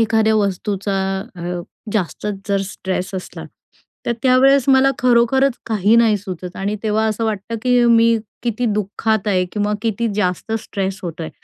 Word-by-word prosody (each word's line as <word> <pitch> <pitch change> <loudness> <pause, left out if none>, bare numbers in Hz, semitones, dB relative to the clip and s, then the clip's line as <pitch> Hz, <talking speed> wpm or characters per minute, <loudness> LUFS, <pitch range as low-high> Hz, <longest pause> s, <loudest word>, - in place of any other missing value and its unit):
एखाद्या 220 -1 +3
वस्तूचा 200 -1 -1 0.4
अ, 175 0 -4 0.3
जास्तच 210 +1 -2
जर 200 -1 +1
स्ट्रेस 190 -2 -4
असला 185 - -6 0.6
तर 235 - +2
त्यावेळेस 265 +1 +5
मला 270 0 +5
खरोखरच 250 +2 +3
काही 215 -1 +2
नाही 230 -2 +4
सुचत 185 -3 -7
आणि 200 +2 -2
तेव्हा 220 0 +1
असं 220 +1 -1
वाटतं, 215 +1 -3
की 245 -1 +3
मी 230 -1 +5 0.3
किती 235 0 -1
दुःखात 210 +1 -1
आहे 185 -3 +2
किंवा 210 0 0
किती 230 0 -1
जास्त 195 +1 -1
स्ट्रेस 195 -3 -4
होतो 170 -2 -5
आहे 160 - -5
215 Hz, 150 wpm, -19 LUFS, 195-230 Hz, 0.6 s, त्यावेळेस